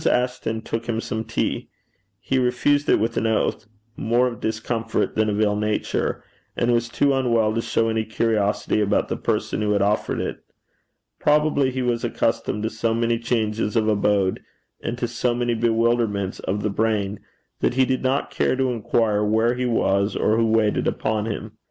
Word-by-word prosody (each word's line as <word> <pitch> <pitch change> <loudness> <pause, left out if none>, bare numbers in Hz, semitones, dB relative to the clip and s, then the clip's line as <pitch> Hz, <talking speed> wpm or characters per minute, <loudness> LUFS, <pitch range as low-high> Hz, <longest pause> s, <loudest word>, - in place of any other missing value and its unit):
Ashton 125 -3 0
took 115 +1 -4
him 115 -1 0
some 110 -1 -3
tea. 115 0 -2 0.5
He 135 - 0
refused 130 +4 +1
it - - +5
with 115 +2 -1
an 115 - +1
oath 110 -1 0 0.3
more 120 +3 +2
of 120 -2 -3
discomfort 110 +1 -1
than 110 0 +1
of 105 0 -1
ill 105 -1 +2
nature 105 0 -1 0.3
and 120 0 +2
was 120 0 +1
too 140 +4 +2
unwell 115 -5 +2
to 115 - 0
show 115 0 0
any 110 0 0
curiosity 110 -1 0
about 105 0 +1
the - - -1
person - - -1
who 105 0 +1
had 100 -1 +2
offered 105 +1 0
it. - - -4 0.8
Probably 150 -2 +3
he 130 0 -2
was 120 -1 0
accustomed 105 +1 -1
to 110 - 0
so 115 0 -1
many 115 0 +1
changes 110 -2 -1
of 110 -1 +2
abode, 100 -2 +1 0.4
and 120 - -3
to 120 - -1
so 120 +1 -1
many 120 0 0
bewilderments 115 -3 +1
of 100 +2 -3
the 105 - 0
brain, 105 -2 0 0.4
that 120 - 0
he 130 0 +4
did 130 0 -1
not 130 +2 0
care - - +1
to 130 -1 +1
inquire 110 -2 +1
where 110 +3 +2
he 125 0 -1
was 100 -3 +1
or 110 - +2
who 115 0 +2
waited 110 -1 +2
upon 110 0 -1
him. 110 0 -4
115 Hz, 180 wpm, -23 LUFS, 105-120 Hz, 0.8 s, it